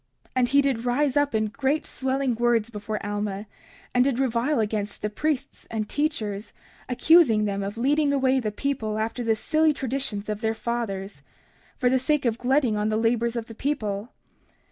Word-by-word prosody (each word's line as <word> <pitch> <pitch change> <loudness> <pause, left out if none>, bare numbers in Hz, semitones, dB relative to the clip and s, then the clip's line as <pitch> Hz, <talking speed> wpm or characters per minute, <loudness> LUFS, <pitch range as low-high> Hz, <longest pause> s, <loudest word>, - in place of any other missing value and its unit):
30:31 - - -44
And 245 -1 +3
he 280 +2 +5
did 255 -4 0
rise 260 +2 +1
up 290 -4 +2
in 215 0 +2
great 275 +7 -1
swelling 265 -1 -1
words 235 -1 +1
before 210 -1 -4
Alma, 205 0 -3 0.5
and 250 - +5
did 265 -2 +1
revile 260 +2 +1
against 210 -2 -2
the 210 - -1
priests 280 +3 -2
and 215 -2 -2
teachers, 220 -9 -2 0.4
accusing 250 -5 +5
them 200 -1 -1
of 200 +3 -4
leading 285 +4 +2
away 265 -1 +3
the 215 -4 -2
people 220 -3 -2
after 225 +3 -2
the 225 -1 +2
silly 310 +7 +2
traditions 260 -6 -3
of 210 0 -3
their 225 -1 0
fathers, 215 -4 -4 0.6
for 250 - +1
the 260 +1 +3
sake 295 +2 +1
of 235 0 +1
glutting 255 -3 +2
on 210 +1 0
the 215 - +1
labors 230 +1 +1
of 230 -2 -2
the 225 - -10
people. 225 -5 -2
235 Hz, 185 wpm, -25 LUFS, 215-270 Hz, 0.6 s, he